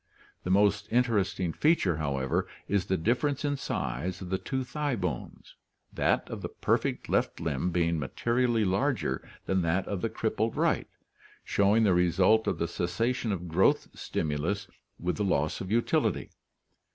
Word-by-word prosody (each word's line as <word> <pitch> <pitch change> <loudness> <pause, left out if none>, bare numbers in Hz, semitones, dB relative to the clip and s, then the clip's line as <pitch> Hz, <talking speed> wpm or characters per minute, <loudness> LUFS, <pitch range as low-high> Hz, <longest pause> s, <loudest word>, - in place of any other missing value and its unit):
The - - -4
most 100 +1 +3
interesting 100 -8 +1
feature, 150 - +2
however, 70 -4 -1 0.2
is 100 -2 0
the 95 - +1
difference 130 - 0
in 145 0 +1
size 90 - -3
of 95 -1 -7
the 95 - 0
two 130 -1 -2
thigh 145 +1 -2
bones, 90 - -5 0.4
that - - +1
of - - -6
the - - -4
perfect - - -1
left - - 0
limb 80 +2 -1
being 85 -2 +1
materially 115 - +1
larger 110 +9 0 0.2
than 95 -1 +1
that 85 +3 0
of 100 -3 -3
the - - 0
crippled - - -1
right, - - +1 0.6
showing 100 +3 +3
the 100 -4 +4
result 90 +5 +3
of - - 0
the 85 - -1
cessation 115 +8 -1
of 90 -3 -3
growth 85 +4 +2
stimulus 80 +7 -2 0.3
with 90 +1 -1
the 105 - 0
loss 80 -5 0
of 95 - -5
utility. 115 +1 +1
95 Hz, 155 wpm, -29 LUFS, 85-115 Hz, 0.6 s, the